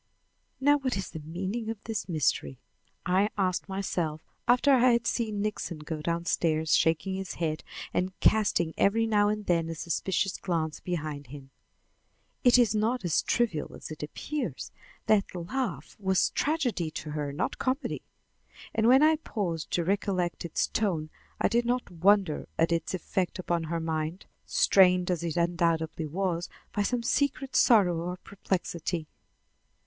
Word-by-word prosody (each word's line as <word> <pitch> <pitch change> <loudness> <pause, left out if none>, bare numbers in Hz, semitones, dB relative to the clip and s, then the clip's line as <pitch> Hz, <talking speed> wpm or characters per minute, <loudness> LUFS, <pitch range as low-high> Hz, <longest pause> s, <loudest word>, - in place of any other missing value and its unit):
"Now 290 +2 +4
what 260 -5 -1
is 190 - -4
the 160 - -6
meaning 190 +9 -4
of 225 - -3
this 220 -3 -4
mystery?" 135 - 0 0.5
I 190 +3 +3
asked 185 -1 0
myself 175 -5 -2 0.2
after 250 +4 +5
I 255 -1 +5
had 235 0 +1
seen 215 -5 -1
Nixon 210 -5 -3
go 150 +1 -5
downstairs, 165 -1 +1
shaking 165 +4 +2
his 190 0 -4
head 155 -2 -2 0.3
and 185 +1 -1
casting 200 -6 +3
every 225 +3 +3
now 205 -2 +3
and 210 0 -2
then 165 -2 +1
a 165 - -4
suspicious 180 +4 -1
glance 165 -5 -2
behind 155 -5 -4
him. 135 0 -11 0.9
"It 250 -2 +7
is 235 -4 +4
not 220 +1 0
as 165 - +2
trivial 215 -11 -1
as - - -9
it 155 - -7
appears. 290 - -4 0.3
That 205 -3 +2
laugh 175 - -3
was 190 -2 +2
tragedy 255 - 0
to 155 0 -6
her, 150 -1 -3
not 145 +6 -3
comedy." 260 +3 -1 0.7
And 225 0 +2
when 260 +4 +7
I 315 0 +5
paused 180 - -3
to 175 - +2
recollect 185 -1 -1
its 170 - 0
tone 165 -8 -1 0.3
I - - +3
did 240 0 +2
not 245 -3 -1
wonder 185 -1 +2
at 165 +1 +2
its 170 +2 0
effect 185 +1 -2
upon 175 -2 -1
her 165 +1 -2
mind, 160 +2 -3 0.2
strained 180 -2 +4
as 175 -2 -1
it 170 -1 -2
undoubtedly 165 -2 0
was 175 +1 -2 0.2
by 205 - 0
some 235 +3 0
secret 275 +1 0
sorrow 190 -8 +5
or 180 +1 -4
perplexity. 175 -3 -3
180 Hz, 155 wpm, -28 LUFS, 165-215 Hz, 0.9 s, It